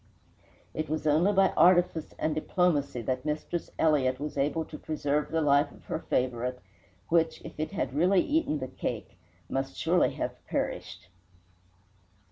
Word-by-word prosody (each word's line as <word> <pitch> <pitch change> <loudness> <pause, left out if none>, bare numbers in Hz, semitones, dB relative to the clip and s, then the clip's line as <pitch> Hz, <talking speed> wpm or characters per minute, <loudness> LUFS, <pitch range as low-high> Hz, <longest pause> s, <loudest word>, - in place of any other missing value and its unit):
It 155 -1 -3
was 155 0 -2
only 155 +6 +4
by 195 -1 +4
artifice 175 -3 +3
and 155 - 0
diplomacy 155 -6 0
that 130 +2 -2
Mistress 155 +3 -3
Elliott 135 -5 +2
was 150 +1 -4
able 145 +3 0
to 150 - -9
preserve 150 -1 -1
the 160 0 0
life 145 0 +3
of - - -18
her - - -3
favourite, 125 0 -1 0.5
which, 165 -1 +2
if - - -10
it 155 - -1
had 130 -8 -2
really 180 +6 +4
eaten 315 - +1
the 130 -2 -4
cake, - - -5 0.3
must 135 0 -3
surely 175 +2 +3
have - - -4
perished. - - -3
155 Hz, 150 wpm, -29 LUFS, 140-165 Hz, 0.5 s, only